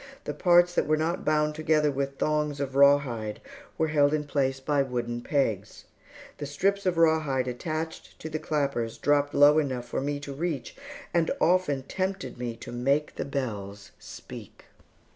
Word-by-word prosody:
The 150 - -4
parts 175 +3 +4
that - - +1
were 155 0 +3
not 165 +3 -1
bound 150 0 +1
together 155 -1 +2
with 140 0 -3
thongs 150 -1 0
of 135 -2 -3
rawhide, 140 -6 +3 0.4
were 160 - +1
held 145 -1 +3
in 150 - -2
place 135 -2 -1
by 140 +1 +1
wooden 120 -2 -3
pegs. 110 -8 -2 0.5
The 145 - -4
strips 195 +7 0
of 175 -2 +1
rawhide 155 -6 +2
attached 155 +6 -5
to - - -7
the 155 0 -3
clappers 140 -8 -2
dropped 145 0 +1
low 145 +2 +7
enough 130 -5 -2
for - - -3
me 145 +1 -2
to 140 -1 -6
reach, 155 -1 -4 0.4
and 170 -2 +2
often 170 -6 +2
tempted 190 -2 -4
me 120 -2 -3
to - - -10
make 140 +5 0
the - - -3
bells 105 -8 -5
speak. - - -11
145 Hz, 165 wpm, -27 LUFS, 130-155 Hz, 0.5 s, low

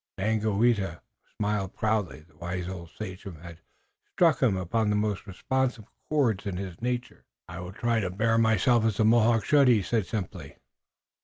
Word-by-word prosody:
Daganoweda 105 -3 +1 0.4
smiled 105 -2 -1
proudly. 105 -7 -1
The 75 -1 -24
wise 85 +2 -4
old 90 -3 -7
sachem 95 -1 -8
had 85 -1 -11 0.5
struck 165 -3 +3
upon 105 -1 +1
the 105 - +2
most 105 -1 -1
responsive 125 +3 -1 0.2
chords 120 -10 +1
in 95 -3 -3
his 95 -1 -7
nature. 125 0 -3 0.2
"I 85 -1 -8
will 90 0 -7
try 115 +2 0
to 95 -4 -1
bear 115 +5 +1
myself 115 +1 +3
as 110 -3 0
a 110 - +4
Mohawk 115 -1 +4
should," 145 -3 +5
he 115 -5 +4
said 110 +1 0
simply. 105 -6 -5
105 Hz, 160 wpm, -27 LUFS, 95-115 Hz, 0.5 s, should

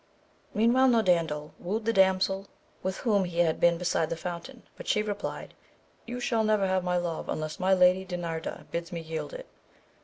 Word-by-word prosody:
Meantime 245 +4 +4
Norandel 165 -8 +1
wooed 215 +5 -3
the 230 - +2
damsel 190 0 +3 0.3
with 190 0 -2
whom 205 -5 +2
he 175 -2 -5
had 160 -2 +1
been 170 -1 +4
beside 170 -2 0
the - - -2
fountain, 180 +10 -7
but - - -10
she 210 - +2
replied, 205 -1 -5 0.5
you 245 +1 -4
shall 230 -2 +1
never 215 -2 +2
have 185 -1 +1
my 180 0 +1
love 170 -2 -3
unless 155 0 -3
my 190 +1 +2
Lady 180 +1 +5
Dinarda 170 -3 -5
bids 170 0 -4
me 170 - -4
yield 160 - -5
it. - - -8
185 Hz, 180 wpm, -28 LUFS, 170-215 Hz, 0.5 s, Lady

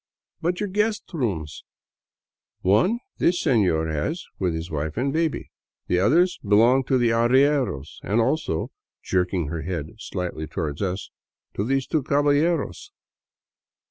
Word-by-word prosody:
" - - -52
But 175 +2 0
your 210 - -1
guest 210 +2 0
rooms? 95 - -3 0.3
" - - -70
" - - -70
One 115 - +3 0.2
this 175 +1 +3
senor 95 - +2
has 80 - -2
with 90 -3 0
his 80 +1 -5
wife 75 +2 -3
and 135 +3 0
baby. 160 -1 -1 0.3
The 90 - +1
other 155 - +5 0.2
belongs 115 +6 +4
to 130 - +3
the 120 -2 +3
arrieros 120 - +2
— - - -31
and 105 +5 +1
also," 115 - 0 0.3
jerking 90 -4 0
her 85 0 -3
head 80 -3 -4
slightly 90 -6 -4
toward 75 -3 -4
us, 95 0 -3 0.2
" - - -59
to 100 - -2
these 135 +3 0
two 155 - 0
caballeros." 145 - +1
115 Hz, 155 wpm, -24 LUFS, 90-145 Hz, 0.3 s, other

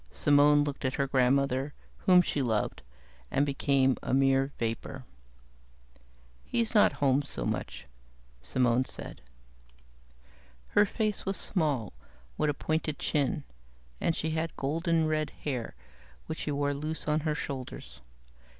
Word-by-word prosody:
Simone 145 0 +4
looked 145 -1 -4
at 130 -1 0
her 140 - +1
grandmother, 135 +1 +1 0.3
whom 180 -1 +7
she 145 - -1
loved, 110 -5 -1 0.5
and 140 - +2
became 135 -2 +2
a - - 0
mere 135 0 +3
vapor. 115 +3 -4 1.4
"He's 230 - -1
not 210 - +5
home 140 -1 +2
so 140 - -5
much," - - -4 0.6
Simone 125 - +1
said. - - -9 1.5
Her 205 - +4
face 215 -1 -1
was 195 0 0
small, 145 - +1 0.4
with 150 - +1
a 145 - 0
pointed 155 0 -2
chin, 145 -4 0 0.6
and 165 - +1
she 160 - -2
had 160 +1 -2
golden 165 +3 +1
red 155 -1 0
hair 130 -6 -3 0.5
which - - -5
she 150 - -2
wore 145 0 0
loose 155 +3 -4
on 150 0 +2
her 155 -1 -1
shoulders. 130 - -6
145 Hz, 130 wpm, -29 LUFS, 130-155 Hz, 1.5 s, whom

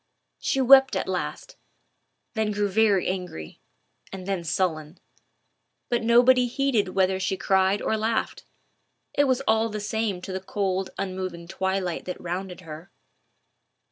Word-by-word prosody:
She 270 - 0
wept 265 +1 +7
at - - -1
last, - - -4 0.8
then 220 -2 0
grew 205 -1 0
very 205 -2 +3
angry, 180 - -5 0.5
and 190 -1 -7
then 195 -3 -2
sullen; 160 -2 -2 0.9
but 240 -1 +1
nobody 245 +2 +5
heeded 235 -7 0
whether 190 0 +2
she 190 +1 -1
cried 190 +1 +2
or - - +1
laughed. 220 +1 -1 0.7
It 285 - +3
was 260 -1 +1
all 225 -3 +2
the 215 0 -4
same 210 -2 -2
to 190 - -7
the 190 - -3
cold 190 -1 -2
unmoving 185 -3 -4
twilight 190 -1 -2
that 180 - -5
rounded 180 +1 -5
her. 160 +2 -10
195 Hz, 140 wpm, -25 LUFS, 185-225 Hz, 0.9 s, wept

